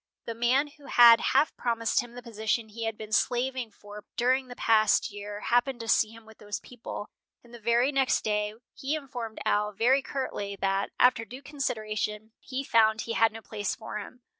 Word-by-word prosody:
The 230 - -4
man 240 +5 +2
who 290 -1 -16
had 235 -2 +8
half 310 - +2
promised 230 -2 0
him 240 0 -11
the 245 - -9
position 220 0 -2
he 225 +2 -5
had 225 -1 -3
been 215 0 -9
slaving 250 +2 0
for 205 0 -12
during 255 +2 +2
the 245 - -9
past 220 -3 +3
year 205 0 -7
happened 245 +1 +1
to 230 - -7
see 220 -1 +3
him 225 0 -14
with 220 0 -16
those 205 -1 -5
people, 235 -3 -8 0.3
and 240 0 -18
the 240 - -10
very 235 +4 +2
next 270 -2 +2
day 210 0 -1 0.2
he 275 +3 -2
informed 245 -7 -6
Al 210 0 +1
very 245 +6 +3
curtly 230 -8 -4
that, 195 0 0
after 250 -2 +4
due 250 +4 -10
consideration, 220 -6 -3
he 265 +1 -5
found 220 -3 +3
he 230 - -4
had 225 -1 +4
no 225 +1 -9
place 205 -2 -3
for 220 -1 -6
him. 240 +4 -11
230 Hz, 195 wpm, -28 LUFS, 215-250 Hz, 0.3 s, had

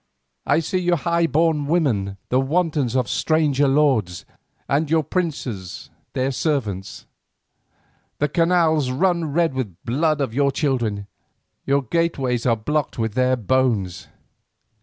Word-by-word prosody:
I 145 +3 +3
see 185 +4 -1
your 175 -1 +2
highborn 165 -2 +1
women 115 - 0
the 125 - +2
wantons 145 -3 0
of 125 -3 +1
stranger 145 +2 +1
lords, 135 -11 +1 0.4
and 145 +2 0
your 160 0 +2
princes 140 - -4 0.2
their 130 +1 0
servants; 110 - -3 1.1
the 150 - +1
canals 160 -3 +2
run 170 +3 0
red 165 0 +1
with 130 -3 -2
the 90 - -21
blood 150 +5 +1
of 135 -5 -2
your 140 +2 +2
children, 120 -8 -1 0.6
your 140 0 +2
gateways 130 -4 -1
are 115 - +4
blocked 150 +6 -2
with 110 -2 -1
their 130 +1 +2
bones. 110 -7 0
140 Hz, 130 wpm, -22 LUFS, 120-160 Hz, 1.1 s, are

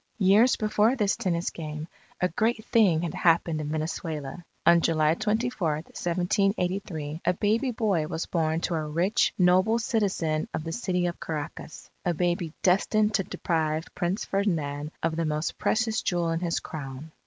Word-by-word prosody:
Years 210 +5 +5
before 215 +3 +2
this 210 -5 +1
tennis 170 -2 -1
game, 155 -1 -6 0.3
a 180 - +2
great 220 +5 0
thing 185 -8 +3
had 170 - -3
happened 165 -2 +2
in 150 - -4
Venezuela. 155 0 -4 0.2
On 170 0 +6
July 155 -1 +3
24, 215 -3 0
1783, 175 0 -1
a - - +2
baby 225 +7 +1
boy 205 -10 0
was 160 +1 -3
born 160 -1 0
to 175 - -1
a 155 -2 -1
rich, 170 +7 +2
noble 185 +5 +4
citizen 195 -9 0
of - - -3
the 165 - -4
city 180 -3 -1
of 175 0 -3
Caracas 155 0 -6
a 175 -1 0
baby 175 -1 0
destined 210 +3 +3
to 195 - +2
deprive 160 -2 -1
Prince 180 +4 -1
Ferdinand 155 -7 -1
of 165 -1 0
the 165 - 0
most 155 +1 -2
precious 220 0 +1
jewel 175 -2 0
in 165 - 0
his 170 -1 -1
Crown. 140 0 -7
175 Hz, 160 wpm, -27 LUFS, 155-200 Hz, 0.3 s, On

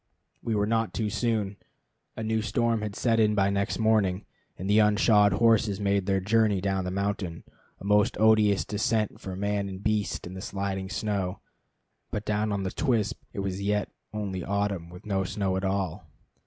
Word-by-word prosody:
We 115 - -1
were 105 0 +2
not 115 0 0
too 110 -2 -1
soon. 105 -4 -1 0.6
A 110 - -3
new 110 0 0
storm 115 +1 0
had 105 -1 -4
set 115 -2 +2
in 105 -1 +3
by 100 -1 +3
next 100 0 -1
morning, 105 -4 +2 0.3
and 95 - -5
the 105 +2 +4
unshod 105 -1 +5
horses 110 -2 +3
made 100 -1 +1
their 95 -1 +2
journey 105 0 +2
down 95 -1 -1
the - - -2
mountain, 100 -3 -3 0.4
a - - -10
most 105 0 +3
odious 110 -2 +4
descent 110 0 -1
for 95 -1 -5
man 100 0 -1
and 95 +1 -8
beast, 105 -1 -1
in 90 - -7
the 95 - -7
sliding 95 -1 -3
snow. 100 -4 -2 0.7
But 105 0 -4
down 105 0 0
on 100 -1 -1
the 95 - -2
Twispt 115 -6 0
it 100 - -4
was 95 0 -3
yet 105 +1 0 0.2
only 100 -4 -3
autumn, 100 -3 -1
with 90 +4 -12
no 95 -2 0
snow 95 0 -1
at 95 - -2
all. 95 -5 -2
100 Hz, 185 wpm, -27 LUFS, 95-110 Hz, 0.7 s, unshod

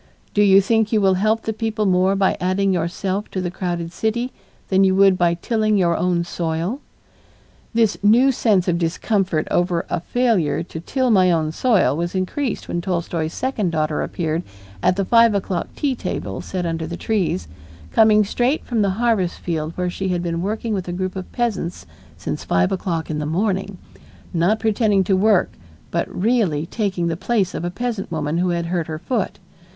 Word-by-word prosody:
Do 205 - +3
you 195 -1 +6
think 220 +1 +1
you 220 - +3
will 195 -2 +4
help 215 +4 +1
the 220 - -2
people 220 -1 -2
more 185 +1 +3
by 195 -1 +2
adding 190 +1 +1
yourself 185 +4 -2
to 190 - -4
the 180 -1 -2
crowded 175 -2 -3
city 235 +5 -1 0.4
than 190 0 +4
you 190 -1 +3
would 195 -1 +5
by 175 -1 +2
tilling 215 +3 0
your 170 -3 +2
own 175 -1 +1
soil?" 170 - -2 1.0
This 225 -3 +2
new 235 +6 +5
sense 210 -7 +2
of 170 -1 +1
discomfort 180 0 0
over 175 -1 +1
a - - 0
failure 205 -6 +1
to 160 - -8
till 255 - 0
my 185 -3 +5
own 160 -3 +1
soil 195 - +2
was 175 +3 -3
increased 215 +7 -2
when 175 - -2
Tolstoy's 170 -3 -2
second 240 -8 -1
daughter 155 -2 -1
appeared 160 -1 -2 0.4
at 180 - +3
the 195 0 -1
five 230 0 +5
o'clock 185 -3 -2
tea 285 -3 0
table 105 - -4
set 185 -2 -4
under 165 -1 -2
the 170 +1 -5
trees, 180 - -1 0.4
coming 215 -1 +5
straight 245 +8 0
from 235 -3 0
the 200 - +2
harvest 225 -7 +1
field 160 -2 -3
where 180 -1 -1
she 190 +1 -3
had 175 -2 -1
been 170 -1 -2
working 215 +3 -2
with 190 -3 -3
a - - -3
group 185 +1 -3
of 185 -1 -6
peasants 200 - -2 0.3
since - - -4
five 90 0 +1
o'clock 170 -4 -2
in 150 - -2
the 150 - -3
morning, 195 +3 -1 0.6
not 180 +6 +2
pretending 215 -2 +2
to 190 +1 +2
work 200 0 +3 0.4
but - - -1
really 190 -8 +1
taking 195 -3 -2
the 165 -1 0
place 195 0 0
of - - -4
a 175 - -1
peasant 220 -1 -4
woman 155 0 -1
who 180 0 +1
had 170 -1 -1
hurt 170 -1 -2
her 155 -1 -4
foot. 220 +4 -2
185 Hz, 190 wpm, -21 LUFS, 170-215 Hz, 1.0 s, you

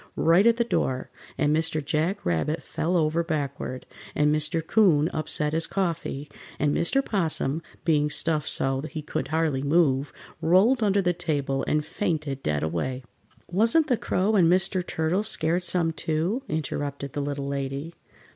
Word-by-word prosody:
right 175 +7 +4
at 230 0 +4
the 235 - +3
door, 130 - -1 0.3
and 150 +1 +2
Mr. 160 -1 0
Jack 160 +7 -1
Rabbit 85 - -1
fell 175 +3 -1
over 160 +1 +1
backward, 140 -5 -4 0.3
and 150 0 +3
Mr. 155 +1 -1
'Coon 165 -7 +3
upset 155 -1 -1
his 165 +1 +1
coffee, 165 -6 -2 0.3
and 145 0 +1
Mr. 270 +11 +1
'Possum, 160 -6 0 0.2
being 150 -3 +2
stuffed 155 -1 0
so 135 0 +1
he 155 -2 -6
could 135 -2 -3
hardly 155 -3 0
move, 145 -2 +2 0.3
rolled 200 +10 +4
under 200 -2 +2
the 180 0 +2
table 145 -5 -1
and 150 0 +1
fainted 155 -7 -2
dead 75 - -1
away. 125 +12 -2 0.4
"Wasn't 230 - +3
the 260 -5 +2
Crow 210 0 0
and 175 -4 +5
Mr. 185 0 +1
Turtle 165 +3 -1
scared 175 -5 0
some, 175 -2 +2
too?" 165 +10 -1
interrupted 140 -2 -3
the 145 - -2
Little 140 0 -3
Lady. 140 +3 -4
160 Hz, 155 wpm, -26 LUFS, 145-180 Hz, 0.4 s, and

